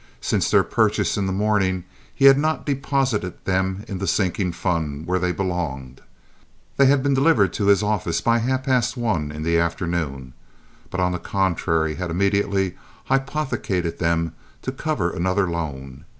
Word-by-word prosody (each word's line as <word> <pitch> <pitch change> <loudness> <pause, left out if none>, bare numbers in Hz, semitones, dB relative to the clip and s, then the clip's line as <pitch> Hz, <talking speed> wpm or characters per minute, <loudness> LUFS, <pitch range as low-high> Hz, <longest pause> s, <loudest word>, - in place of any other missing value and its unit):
Since - - 0
their - - +5
purchase - - +1
in 100 -2 -1
the - - -1
morning, 95 -2 +1 0.3
he 135 - +1
had 135 0 +8
not 155 +1 0
deposited 135 - -1
them 95 +1 -1
in 95 - -5
the 95 - -3
sinking 90 +1 0
fund, 80 -5 -2
where 90 +1 0
they 90 0 0
belonged 80 -9 -4 0.8
(they 140 - +6
had 135 -1 +3
been 140 -1 +2
delivered 135 - +3
to 100 - -1
his 100 0 +5
office 105 -5 0
by 115 0 +2
half 130 +3 -1
past 125 -2 +1
one 90 -11 -1
in 75 +1 -6
the 85 +1 +2
afternoon), 85 -6 -2 0.6
but, 90 - -4
on 90 0 +2
the 90 - -3
contrary, 85 -5 0
had 90 +2 -4
immediately 100 +1 +1 0.3
hypothecated 135 - -1
them 85 -1 0 0.3
to 130 - -2
cover 130 - -1
another 95 +3 0
loan. 70 -6 -5
95 Hz, 165 wpm, -22 LUFS, 85-115 Hz, 0.8 s, had